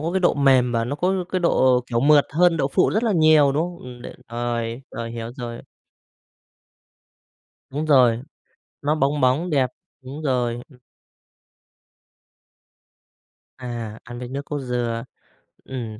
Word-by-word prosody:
có 165 Hz, +3 st, -2 dB
cái 190 Hz, -, +1 dB
độ 175 Hz, -, +3 dB
mềm 130 Hz, -3 st, +3 dB
và 115 Hz, -1 st, 0 dB
nó 140 Hz, +4 st, -3 dB
có 185 Hz, +4 st, +1 dB, 0.2 s
cái 185 Hz, -, 0 dB
độ, 130 Hz, -7 st, +3 dB
kiểu, 115 Hz, -1 st, -1 dB
mượt 145 Hz, +1 st, +5 dB
hơn 170 Hz, +1 st, +4 dB
đậu 135 Hz, -3 st, 0 dB
phụ 180 Hz, -, +2 dB
rất 215 Hz, +3 st, 0 dB
là 225 Hz, -, +1 dB
nhiều, 155 Hz, -5 st, +5 dB
đúng 150 Hz, -, +1 dB
không? 175 Hz, 0 st, -5 dB
Ừm, 125 Hz, -1 st, -11 dB
đ -, -, -7 dB, 0.2 s
rồi, 120 Hz, 0 st, -3 dB
rồi, 115 Hz, 0 st, -5 dB
hiểu 115 Hz, 0 st, -6 dB
rồi. 120 Hz, -3 st, -6 dB, 2.1 s
Đúng 150 Hz, +4 st, -3 dB
rồi, 125 Hz, -6 st, +4 dB, 0.6 s
nó 150 Hz, +2 st, +1 dB
bóng 145 Hz, 0 st, 0 dB
bóng, 130 Hz, +8 st, +2 dB
đẹp, 135 Hz, -4 st, +2 dB, 0.3 s
đúng 135 Hz, +4 st, -8 dB
rồi. 125 Hz, -4 st, -1 dB
Ừm. 130 Hz, -4 st, -19 dB, 2.8 s
À, 120 Hz, -4 st, -6 dB
ăn 120 Hz, +1 st, -9 dB
với 125 Hz, -, -6 dB
nước 140 Hz, +2 st, -5 dB
cốt 145 Hz, -1 st, -4 dB
dừa, 120 Hz, -3 st, -2 dB, 0.6 s
ừm, 115 Hz, -5 st, -6 dB
130 Hz, 155 wpm, -22 LUFS, 120-150 Hz, 2.8 s, mượt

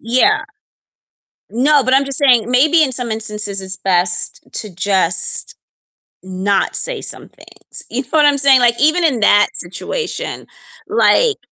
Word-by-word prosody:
Yeah. 255 Hz, -, 0 dB, 1.1 s
No, 275 Hz, +3 st, +1 dB
but 260 Hz, +1 st, 0 dB
I'm 275 Hz, +1 st, +1 dB
just 275 Hz, -1 st, +2 dB
saying 245 Hz, -5 st, +1 dB
maybe 305 Hz, +6 st, +2 dB
in 270 Hz, -, -1 dB
some 245 Hz, -3 st, 0 dB
instances 210 Hz, -2 st, +1 dB
it's 190 Hz, -1 st, -1 dB
best 175 Hz, -1 st, +1 dB
to 210 Hz, -5 st, -4 dB
just 190 Hz, -2 st, +2 dB, 0.7 s
not 190 Hz, +1 st, -3 dB
say -, -, +2 dB
some -, -, 0 dB
things, -, -, -7 dB
you 260 Hz, +3 st, -4 dB
know -, -, -21 dB
what 305 Hz, -2 st, +1 dB
I'm 285 Hz, -1 st, 0 dB
saying? 270 Hz, -2 st, +4 dB
Like, 235 Hz, -1 st, 0 dB
even 310 Hz, +5 st, +1 dB
in 260 Hz, -9 st, -1 dB
that 205 Hz, 0 st, +2 dB
situation, 180 Hz, -, -5 dB, 0.4 s
like 450 Hz, +1 st, 0 dB
245 Hz, 150 wpm, -14 LUFS, 200-285 Hz, 1.1 s, saying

